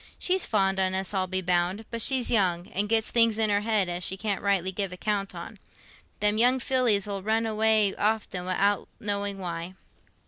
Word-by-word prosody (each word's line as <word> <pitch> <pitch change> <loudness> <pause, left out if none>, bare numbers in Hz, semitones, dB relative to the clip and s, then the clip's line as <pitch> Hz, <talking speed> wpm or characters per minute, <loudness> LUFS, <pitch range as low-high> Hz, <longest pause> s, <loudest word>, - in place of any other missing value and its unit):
"She's 370 0 0
fond 195 -3 +1
on 190 0 +1
us, 190 +1 -2
I'll 190 -1 0
be 185 0 -2
bound; 180 +4 0
but 230 -1 -3
she's 260 +1 +2
young, 180 -6 +1
an' 205 +2 -2
gets 220 0 +1
things 230 -2 +3
in 220 -2 +2
her 205 0 +2
head 215 -3 +1
as 175 0 -3
she 190 - 0
can't 205 -1 -2
rightly 195 -2 0
give 195 0 -3
account 200 +1 -3
on. - - -9 0.6
Them 210 +1 +2
young 250 +3 +5
fillies 245 -6 +2
'ull 200 -1 -4
run 220 +3 0
away 220 -2 +2
often 210 -4 -1
wi'out 200 +2 0
knowing 200 -1 -2
why." 175 -1 -6
205 Hz, 195 wpm, -26 LUFS, 190-220 Hz, 0.6 s, young